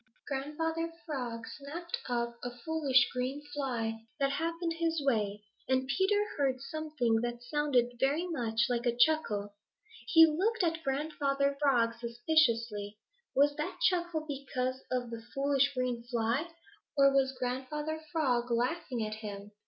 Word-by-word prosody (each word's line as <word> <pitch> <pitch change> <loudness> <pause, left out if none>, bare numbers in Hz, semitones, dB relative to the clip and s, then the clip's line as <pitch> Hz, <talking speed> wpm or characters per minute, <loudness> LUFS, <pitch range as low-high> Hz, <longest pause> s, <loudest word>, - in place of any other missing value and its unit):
Grandfather 320 +4 -2
Frog 245 -7 -4
snapped 325 +5 -6
up 235 -1 -1
a 245 - -2
foolish 265 0 +2
green 255 +3 -2
fly 230 -5 -2 0.2
that 275 0 +2
happened 330 +3 -1
his 330 -1 +1
way, 210 -5 +1 0.3
and 260 0 +2
Peter 405 +7 +2
heard 270 -3 +1
something 275 -6 0
that 240 0 -3
sounded 245 -3 +1
very 285 +7 +2
much 230 -9 -1
like 245 0 0
a 240 0 +1
chuckle. 230 -8 +2 0.5
He 325 +4 +9
looked 375 +8 +1
at 325 -1 0
Grandfather 280 0 0
Frog 240 -5 +3
suspiciously. 230 -4 +1 0.4
Was 285 +1 +4
that 335 +5 -3
chuckle 345 -3 +1
because 260 -2 -3
of 245 -2 -1
the 230 -1 -5
foolish 275 0 +3
green 250 -2 -1
fly, 240 +6 -1 0.5
or 275 0 +6
was 265 -1 +2
Grandfather 295 +5 -3
Frog 250 -7 +1
laughing 245 0 0
at 215 - -4
him? 205 -1 -7
270 Hz, 135 wpm, -32 LUFS, 240-310 Hz, 0.5 s, He